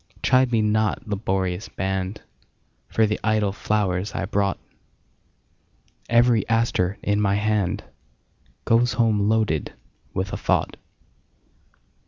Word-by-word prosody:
Chide 130 -1 +3
me 110 -2 +2
not, 110 +3 0
laborious 95 -2 -2
band, 95 +1 -3 0.6
For 110 - +2
the 105 0 -1
idle 110 -2 +1
flowers 100 -1 -1
I - - -1
brought; 100 -1 0 1.5
Every 120 -1 +4
aster 115 -5 +1
in 105 0 +1
my 100 -1 +2
handGoes 110 +3 -2
home 110 -3 +2
loaded 110 -9 0 0.4
with 95 +1 -3
a - - -1
thought. - - 0
105 Hz, 105 wpm, -23 LUFS, 95-110 Hz, 1.5 s, Every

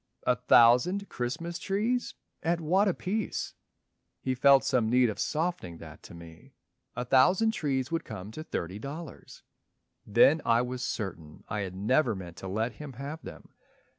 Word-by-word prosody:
"A 125 - +3
thousand 125 - +4
Christmas 165 +8 -4
trees! 220 +7 -1 0.3
at 170 +1 0
what 185 +6 +2
apiece?" 195 +3 -2 0.7
He 130 - -1
felt 135 +1 +5
some 115 -4 +1
need 125 -1 +4
of - - -9
softening 155 - -2
that - - -12
to - - -12
me: 85 -1 -14 0.4
"A 125 +1 -3
thousand 180 - +4
trees 135 - -2
would 165 0 -1
come 105 -2 -8
to 155 +7 -7
thirty 95 - -4
dollars." 145 +4 -9 0.6
Then 130 +9 +4
I 115 +1 +3
was 125 0 -5
certain 85 -11 -5
I 105 - -2
had 95 -2 -4
never 120 +5 +2
meant 90 -3 -9
To 95 - -7
let 110 +5 -1
him 150 -3 -9
have 140 +6 -7
them. - - -11
130 Hz, 160 wpm, -29 LUFS, 110-165 Hz, 0.7 s, felt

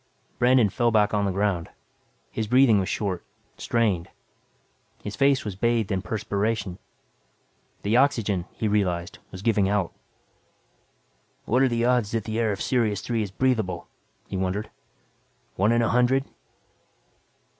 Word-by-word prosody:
Brandon 125 -2 +5
fell 120 +4 +1
back 105 -2 +2
on 100 -1 +1
the 100 - 0
ground. 95 -3 -1 0.6
His 110 -1 -3
breathing 125 -3 +5
was 95 0 -2
short, 95 -4 -2 0.3
strained. 105 -8 0 0.9
His 105 -1 -5
face 135 +3 +2
was 100 -3 -4
bathed 115 0 0
in 95 -1 0
perspiration. 100 0 -2 1.0
The 105 +4 +2
oxygen, 110 -9 +2
he 110 - -3
realized, 95 -4 -1
was 95 0 -9
giving 105 -4 +2
out. 100 -4 0 1.5
What 125 +4 +2
are 135 - +4
the 120 0 0
odds, 125 -4 +2
that 115 -2 0
the 110 +1 -3
air 110 -2 +1
of 100 - -3
Sirius 110 -6 +1
Three 115 0 -1
is 105 - -3
breathable, 110 -5 -1 0.4
he 95 - -4
wondered. 95 +3 -2 0.8
One 105 +4 +2
in 120 0 +3
a 115 - +1
hundred? 125 +3 +2
105 Hz, 145 wpm, -25 LUFS, 100-120 Hz, 1.5 s, Brandon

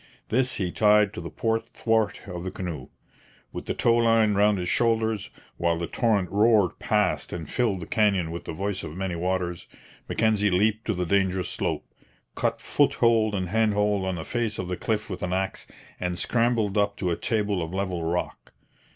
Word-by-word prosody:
This 130 +3 +1
he 90 -3 -2
tied 105 0 +4
to 85 - -6
the 85 - -6
port 115 0 -1
thwart 110 -2 +1
of 90 -2 -6
the 95 - -3
canoe. 85 -9 -6 0.6
With - - -7
the - - -1
tow 115 0 +3
line 115 -2 +4
round 105 +1 +3
his 90 -1 -3
shoulders, 110 0 +1 0.3
while 85 -1 +1
the 85 - -2
torrent 105 -3 0
roared 105 -2 +3
past - - 0
and 85 -3 -5
filled 110 - 0
the - - -5
canyon 100 -6 +1
with 85 - -6
the - - -4
'voice 95 +3 -3
of 80 +1 -7
many 95 -1 -2
waters,' 90 0 -2 0.4
Mackenzie 110 -2 +2
leaped 105 +4 +1
to 110 - 0
the 90 0 -1
dangerous 95 0 +1
slope, - - -2 0.5
cut - - -1
foothold 110 -3 +2
and 95 -2 -2
handhold 105 -2 +2
on 95 -1 -1
the 80 - -6
face 115 -3 -2
of 90 -1 -4
the 90 - -1
cliff 105 +3 -2
with 90 -3 -6
an 90 0 -2
axe, 95 +1 -2 0.3
and 90 -1 -2
scrambled 115 -2 +1
up 100 0 +1
to 90 -2 -1
a - - +1
table 105 -3 0
of 80 0 -4
level 95 -3 -2
rock. 85 +2 -3
100 Hz, 190 wpm, -26 LUFS, 90-110 Hz, 0.6 s, tied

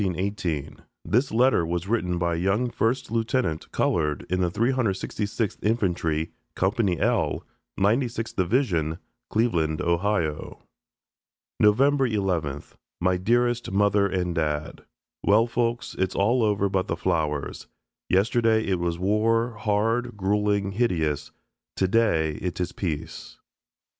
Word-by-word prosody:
NOVEMBER 95 -4 -1
11, 95 - 0
1918 85 -8 -5 0.2
(This 120 +10 +1
letter 120 -4 +3
was 85 +2 -2
written 90 -6 0
by 85 0 0
a - - -1
young 100 +8 0
first 125 +2 -1
lieutenant 115 - -1
(colored) 75 -4 0
in 90 - +1
the 90 - +2
366th 110 -2 -1
Infantry, 85 -7 0 0.2
Company 95 - +1
L, - - +1 0.4
92nd 115 +3 0
Division, 90 - +1 0.3
Cleveland, 85 -9 +1
Ohio.) 85 -3 -1 1.0
November 135 +5 +4
11th. 90 -10 -2 0.3
My 90 +1 +2
dearest 120 +5 +1
Mother 100 0 +3
and 90 -2 -1
Dad: 75 -2 -2 0.4
Well, 105 +3 +4
folks, 120 0 -2
it's 95 0 0
all 120 +6 +2
over 105 -2 +2
but 95 -1 -1
the - - -2
flowers. 75 -3 -2 0.4
Yesterday 110 +3 +3
it 95 -2 0
was 85 -1 -1
war, 110 +5 +1
hard, 115 +2 0
gruelling, 100 0 +1
hideous. 80 - 0 0.4
Today 95 -6 +1
it 90 -1 -3
is 90 - -1
peace. 80 -3 -5
100 Hz, 125 wpm, -25 LUFS, 85-115 Hz, 1.0 s, November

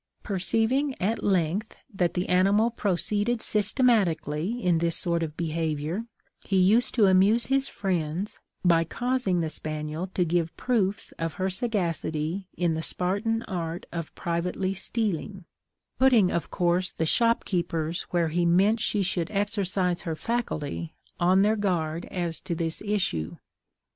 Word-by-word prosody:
Perceiving, 225 +8 0
at 215 +5 -1
length, 190 +2 0 0.2
that 180 -3 0
the 180 0 -1
animal 200 +5 +3
proceeded 210 +2 0
systematically 210 - +1
in 180 -6 +2
this 170 0 0
sort 170 -1 0
of 155 -2 -4
behaviour, 160 +3 -2 0.4
he 195 - 0
used 205 +6 +4
to 220 -5 +5
amuse 195 +5 +4
his 270 0 +1
friends, 180 0 -2 0.3
by 165 -2 +5
causing 240 -1 0
the 160 - -1
spaniel 155 +3 -4
to 180 - +2
give 170 0 -1
proofs 210 -4 0
of 165 -2 -2
her 190 0 -1
sagacity 180 -4 -2
in 175 -2 +1
the 160 - -2
Spartan 205 +7 -1
art 170 -2 -4
of 165 -2 -5
privately 180 +3 -1
stealing; 195 -2 -3 0.5
putting, 240 -8 +5
of 170 - -2
course, 180 +1 0
the 160 - -1
shopkeepers 175 -6 +1
where 170 -2 +1
he 175 +2 0
meant 190 +6 +4
she 210 -2 0
should 175 -2 -1
exercise 195 -3 0
her 165 -2 -3
faculty 165 -6 -3 0.2
on 185 +3 +4
their 215 +2 +3
guard 170 -5 -1
as 170 -4 -3
to 175 -3 -3
the 165 0 -1
issue. 185 - -1
185 Hz, 140 wpm, -27 LUFS, 165-210 Hz, 0.5 s, to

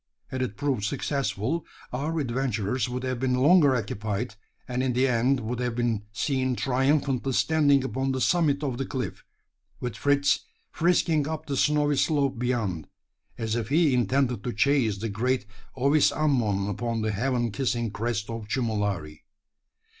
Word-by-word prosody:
Had 130 - -3
it 115 -6 -3
proved 135 -7 -1
successful, 135 +5 -1 0.3
our 150 +6 -2
adventurers 125 -3 -1
would 125 +1 -4
have 130 -2 -2
been 130 0 +1
longer 145 +1 +5
occupied, 110 +1 -3 0.3
and 125 0 -1
in 130 -1 0
the 130 +2 +3
end 125 +2 +2
would 120 +2 -3
have 125 -2 -1
been 115 -4 -1
seen 130 +3 0
triumphantly 135 0 +1
standing 145 -2 +3
upon 135 0 -1
the 130 - -1
summit 150 -1 +2
of 130 -3 -2
the 135 - -1
cliff 130 -3 -4 0.6
with 125 -4 -4
Fritz 140 +3 +2 0.3
frisking 165 -3 +2
up 160 0 -4
the 140 - -3
snowy 150 0 +2
slope 140 -4 +1
beyond, 115 -10 -1 0.5
as 110 -1 -2
if 115 -1 -2
he 155 -1 +3
intended 125 -2 +1
to 120 - -3
chase 130 -4 +2
the 110 +3 -3
great 120 +2 0 0.3
ovis 140 +3 +3
ammon 115 -10 +1
upon 115 +3 -2
the 110 - 0
heaven 120 +2 0
kissing 120 -2 -1
crest 115 0 -2
of 115 -2 -6
Chumulari. 105 - -2
125 Hz, 155 wpm, -26 LUFS, 115-140 Hz, 0.6 s, longer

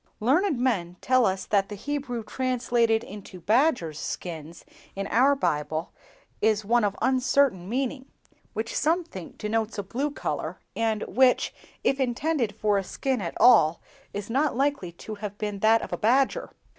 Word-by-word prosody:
Learned 295 - +2
men 185 -9 0
tell 255 -2 +3
us 190 0 -2
that 200 -2 +1
the 205 - -5
Hebrew 265 +1 -3
word 215 - -16
translated 240 -3 +1
into 195 -3 -10
'badgers' 215 - +2
skins' 165 0 -6 0.3
in 195 0 -3
our 270 +4 +4
Bible 155 - -1 0.5
is 215 -1 +2
one 235 +2 +3
of 200 -1 0
uncertain 260 -7 +2
meaning, 260 +2 -2 0.5
which 225 +1 -3
some 335 +4 +2
think 190 - -10
denotes 220 +1 -2
a 200 - -2
blue 260 +9 -2
color, 290 - -4 0.2
and 220 -2 0
which, 255 0 +3 0.3
if 275 - +2
intended 255 -3 0
for 210 -2 +2
a - - -3
skin 260 +4 -2
at 170 - -4
all, 215 -10 +6 0.3
is 205 0 -5
not 275 +2 +1
likely 275 -10 0
to 215 +5 -8
have 205 -1 -5
been 210 -2 -3
that 220 +2 +4
of - - -6
a - - -1
badger. 255 +5 +2
225 Hz, 165 wpm, -26 LUFS, 200-260 Hz, 0.5 s, all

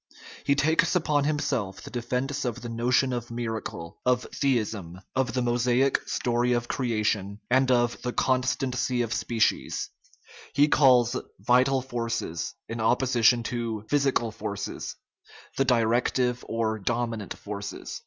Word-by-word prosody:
He 140 - +3
takes 160 +5 +2
upon 150 -4 +2
himself 135 -10 -1
the - - -9
defence 125 +4 -2
of 120 -1 -3
the 120 - -5
notion 125 +3 +2
of 120 -1 -4
miracle, 110 -8 -5
of 125 0 +2
theism, 110 - -1 0.2
of 130 -3 +1
the 125 0 0
Mosaic 125 +2 +2
story 120 0 +1
of 120 0 -1
creation, 105 -5 -1
and 130 +1 +4
of 120 -1 +2
the 125 - -2
constancy 130 -1 0
of 115 - -3
species; 115 -2 0 0.6
he 145 +1 +5
calls 125 -5 +5 0.2
"vital 125 +4 +3
forces," 115 -9 -3
in 115 0 -4
opposition 120 0 +3
to 115 -2 -3
physical 135 -5 +2
forces, 100 -1 -5 0.6
the 135 - +3
di 120 -3 +3
rective 125 +2 +1
or 110 -1 -1
dominant 115 -1 -2
forces. 100 -1 -6
120 Hz, 135 wpm, -27 LUFS, 115-130 Hz, 0.6 s, he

